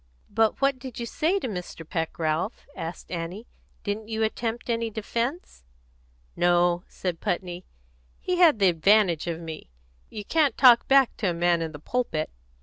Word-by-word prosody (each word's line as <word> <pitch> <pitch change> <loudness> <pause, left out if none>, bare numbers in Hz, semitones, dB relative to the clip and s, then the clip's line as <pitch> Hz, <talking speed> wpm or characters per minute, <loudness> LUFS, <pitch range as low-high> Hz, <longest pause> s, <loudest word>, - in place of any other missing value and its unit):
"But 220 +4 +1
what 275 -1 +2
did 255 -1 -8
you 235 - -3
say 320 - 0
to 380 - -3
Mr. 180 -5 -7
Peck, 165 -1 -3
Ralph?" 160 +6 -2
asked 165 -1 -7
Annie. 175 +5 -5 0.4
"Didn't 210 +1 -3
you 220 0 -1
attempt 225 +1 -2
any 230 -1 -1
defence?" 235 - -4 0.7
"No," 175 0 +3
said 180 -3 -4
Putney. 180 0 -3 0.5
"He 365 -1 -1
had 335 -8 +6
the 195 -2 +4
advantage 175 0 +3
of 165 -1 -3
me. 160 - -8 0.4
You 210 - -7
can't 310 0 +2
talk 245 -3 +7
back 270 -2 +5
at 200 - +1
a - - 0
man 170 0 +2
in 160 -1 -3
the 150 - -8
pulpit." 155 - -2
205 Hz, 165 wpm, -26 LUFS, 170-235 Hz, 0.7 s, talk